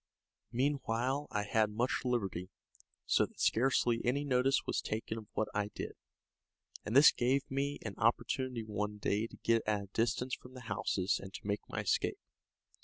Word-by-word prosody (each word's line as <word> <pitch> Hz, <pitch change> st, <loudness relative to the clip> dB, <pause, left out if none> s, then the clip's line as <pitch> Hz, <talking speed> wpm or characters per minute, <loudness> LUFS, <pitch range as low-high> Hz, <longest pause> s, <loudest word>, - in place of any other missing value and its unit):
Meanwhile 130 Hz, +1 st, 0 dB
I 105 Hz, -, -1 dB
had 110 Hz, +1 st, +2 dB
much 115 Hz, +5 st, 0 dB
liberty, 100 Hz, -8 st, -1 dB, 0.6 s
so -, -, +3 dB
that -, -, -21 dB
scarcely 120 Hz, -1 st, +3 dB
any 140 Hz, +4 st, +1 dB
notice 130 Hz, 0 st, +2 dB
was -, -, 0 dB
taken 110 Hz, +1 st, -3 dB
of 105 Hz, -, -12 dB
what 110 Hz, -, 0 dB
I 105 Hz, 0 st, 0 dB
did, -, -, -4 dB, 0.9 s
and 110 Hz, -, -3 dB
this 140 Hz, +2 st, +9 dB
gave 130 Hz, +3 st, +1 dB
me 140 Hz, +1 st, -1 dB
an 110 Hz, -, -4 dB
opportunity 120 Hz, +2 st, +1 dB
one 105 Hz, -1 st, -3 dB
day 105 Hz, +2 st, 0 dB
to -, -, -14 dB
get 115 Hz, -1 st, +3 dB
at 105 Hz, -1 st, +1 dB
a 100 Hz, -, -12 dB
distance 120 Hz, +2 st, 0 dB
from 125 Hz, +1 st, -7 dB
the 130 Hz, -, -8 dB
houses 100 Hz, -3 st, 0 dB
and 95 Hz, -, -8 dB
to -, -, -9 dB
make 100 Hz, 0 st, -1 dB
my -, -, -2 dB
escape. -, -, +1 dB
115 Hz, 175 wpm, -34 LUFS, 105-130 Hz, 0.9 s, this